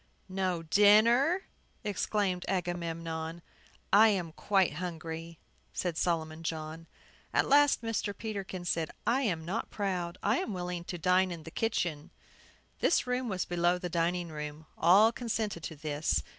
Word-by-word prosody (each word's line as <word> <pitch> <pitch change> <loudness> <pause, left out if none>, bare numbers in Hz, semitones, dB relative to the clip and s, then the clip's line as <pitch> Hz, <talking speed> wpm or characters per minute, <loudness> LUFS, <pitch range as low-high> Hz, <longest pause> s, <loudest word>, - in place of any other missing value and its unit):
"No 185 -3 -1
dinner!" 230 - +5 0.4
exclaimed 200 -2 -1
Agamemnon. 165 -2 -3 0.5
"I 215 +3 +8
am 185 -6 0
quite 195 +2 +1
hungry," 165 -1 -5 0.4
said 175 -3 -2
Solomon 160 -2 -1
John. 160 0 -5 0.4
At - - +2
last 285 -2 +5
Mr. 220 -3 -2
Peterkin 195 -4 -5
said, 165 -2 0 0.2
"I 255 +3 +2
am 170 -10 -1
not 195 +7 -3
proud. 180 -4 -2
I 210 +5 +2
am 215 - -3
willing 180 -1 -4
to 175 - -5
dine 185 +2 +3
in 170 -3 -6
the 160 - -9
kitchen." 170 -10 -1 0.7
This - - +3
room 250 -1 -1
was 190 -2 -1
below 175 0 +2
the 180 0 -4
dining 170 +1 0
room. 150 0 -6
All 200 +7 +6
consented 220 -6 -3
to 160 - -6
this. 145 - -1
180 Hz, 145 wpm, -31 LUFS, 165-205 Hz, 0.7 s, I